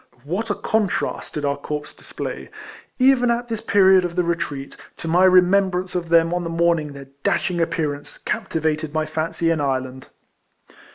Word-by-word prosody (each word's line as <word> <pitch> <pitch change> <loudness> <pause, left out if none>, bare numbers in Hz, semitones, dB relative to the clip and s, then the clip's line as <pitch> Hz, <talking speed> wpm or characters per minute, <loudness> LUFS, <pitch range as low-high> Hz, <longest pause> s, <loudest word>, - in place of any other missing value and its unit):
What 190 +10 -3
a 205 - 0
contrast 215 -3 -1
did 150 -1 -2
our 140 0 0
corps 150 +1 -5
display, - - -7 0.5
even 255 -2 +4
at 240 +1 -1
this 225 -2 -3
period 190 -3 +5
of 175 -1 -3
the 180 - +2
retreat, 150 -5 -3 0.2
to - - -7
my 175 +3 +4
remembrance 185 0 +3
of 175 -2 -3
them 165 0 +4
on 175 0 -1
the 165 - -4
morning 165 -3 +1
their 140 -1 -11
dashing 175 +3 0
appearance 150 -3 -2
captivated 155 -7 -2
my 155 0 +1
fancy 165 +1 -1
in 160 -3 0
Ireland! 130 -1 -2
170 Hz, 165 wpm, -22 LUFS, 150-185 Hz, 0.5 s, period